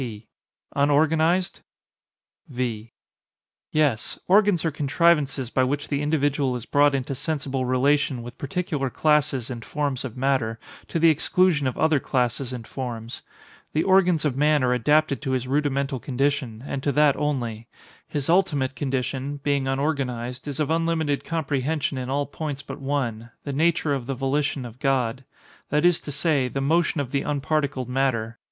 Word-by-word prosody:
P. 110 -4 -6 0.5
Unorganized? 160 +5 +2 0.9
V. 120 -4 -3 0.8
Yes; 145 -7 +1
organs 200 -3 +4
are 160 - +1
contrivances 145 -3 +1
by 130 - +2
which 145 +3 -2
the 145 -1 0
individual 145 -3 +1
is 120 -1 -6
brought 145 +1 +3
into 135 +1 -2
sensible 135 -2 -2
relation 130 0 +1
with 120 +1 -10
particular 145 -2 -2
classes 145 -3 +1
and 120 -2 -6
forms 140 -2 -2
of 130 -2 -6
matter, 130 -4 0 0.3
to - - -2
the 165 0 +6
exclusion 160 -1 +2
of 130 - -3
other 160 -2 +3
classes 125 0 -1
and 120 -3 -6
forms. 120 -3 -6 0.5
The 155 - +2
organs 180 -4 +3
of 140 -4 0
man 150 0 +3
are 125 0 +3
adapted 150 +4 +2
to 135 -2 -2
his 130 -1 -1
rudimental 140 -1 0
condition, 130 -3 -1
and 140 -1 -3
to 140 - 0
that 150 -1 +4
only; 120 -7 -2 0.4
his 145 -3 -3
ultimate 145 -7 +2
condition, 135 +2 -2
being 140 -2 +1
unorganized, 135 -3 -2
is 145 0 -4
of 155 0 0
unlimited 160 -3 0
comprehension 150 -2 -1
in 125 0 -5
all 140 +1 0
points 145 -1 -5
but - - -8
one—the 130 -1 -3
nature 160 0 +2
of 130 -3 -3
the 135 - -2
volition 135 0 -1
of 120 +1 -10
God—that 135 +4 -2
is 175 -2 +4
to 145 - -7
say, 145 -2 +1
the 135 - -3
motion 160 +3 +1
of 135 -3 -3
the 140 - +1
unparticled 145 -3 -1
matter. 125 -3 -1
140 Hz, 155 wpm, -24 LUFS, 130-150 Hz, 0.9 s, the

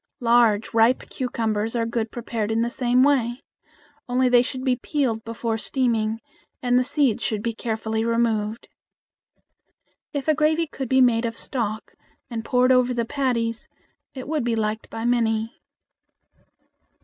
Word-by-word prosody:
Large 230 -3 +3
ripe 230 +3 +3
cucumbers 225 -3 -2
are 230 -1 +1
good 230 -1 -2
prepared 230 -3 -3
the 230 +2 0
same 250 0 +2
way. 255 -3 +1 0.7
Only 250 +1 +2
they 245 -1 +6
should 255 +1 -4
be 260 -2 +2
peeled 245 -4 -1
before 225 0 -3
steaming, 225 -3 0 0.4
and 245 -1 +1
the - - +2
seeds 270 -4 +1
should 210 -2 -2
be 230 - -1
carefully 220 -1 -2
removed. 230 -2 0 1.4
If 285 0 -4
a 310 - +5
gravy 310 +2 +2
could 270 -5 -6
be 260 0 +4
made 240 -2 +3
of 230 0 -6
stock 220 -4 -3 0.4
and 225 -1 -4
poured 250 +2 +3
over 250 -1 +3
the 235 -1 0
patties 230 -4 -1 0.5
it 260 -1 -7
would 305 -3 -1
be 235 -1 0
liked 215 0 -2
by 225 +1 -5
many. 225 -2 +1
235 Hz, 150 wpm, -23 LUFS, 225-255 Hz, 1.4 s, they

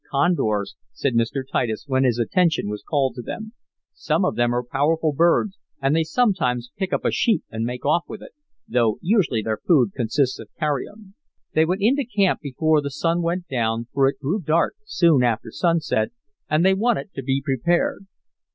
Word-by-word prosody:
"Condors," 135 - 0 0.2
said 140 - -1
Mr. 115 +3 0
Titus, 110 -5 -1
when 130 -2 +1
his 120 -2 +2
attention 165 - +1
was 105 0 -5
called 140 -4 0
to 125 - -7
them. 220 - -7 0.4
"Some 300 -10 0
of - - 0
them 120 0 +2
are 120 0 0
powerful 150 +5 0
birds, 170 +6 +2 0.2
and 135 +2 +1
they 165 - +3
sometimes 160 - 0
pick 190 -2 -3
up - - -1
a - - +2
sheep 230 -4 +1
and 110 +1 -3
make 125 +1 -5
off 160 +4 +2
with 215 - -8
it, - - -12 0.4
though 115 -3 +1
usually 170 - +2
their 110 0 -2
food 130 - +3
consists 130 +3 0
of 110 - -10
carrion." 190 +7 -3 0.4
They 160 - +4
went 185 +4 -1
into 275 +6 +3
camp 205 -6 +1
before 155 +2 +1
the 140 - -4
sun 165 +4 0
went 175 +1 -2
down, 115 -2 -1
for 135 -1 +3
it 135 - -2
grew 160 +9 -1
dark 160 +1 +1
soon 165 - +3
after 115 -2 0
sunset, 165 -10 0 0.4
and 155 +3 +2
they 190 - +5
wanted 215 0 0
to 135 - -5
be 135 +1 0
prepared. 170 +7 0
150 Hz, 190 wpm, -22 LUFS, 125-175 Hz, 0.4 s, they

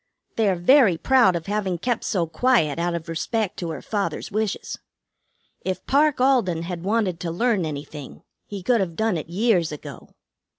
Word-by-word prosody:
They 220 -3 +2
are 190 - +1
very 190 - +5
proud 240 -2 +4
of 165 - -4
having 195 -3 -1
kept 235 +6 -2
so 180 -5 0
quiet 165 - +1
out 170 0 0
of 165 -1 -6
respect 185 +5 -2
to 170 - -4
her 155 - -6
father's 205 -1 -3
wishes. 215 0 -3 0.8
If 185 -1 -3
Parke 290 0 +3
Alden 235 -11 +2
had 175 -1 -5
wanted 200 -4 0
to 170 - -4
learn 190 0 0
anything, 145 -1 -8 0.2
he 200 -3 -7
could 240 +3 +3
have 175 -4 -2
done 220 -1 0
it 160 0 -5
years 185 -3 +1
ago." 150 - -9
185 Hz, 175 wpm, -23 LUFS, 170-225 Hz, 0.8 s, very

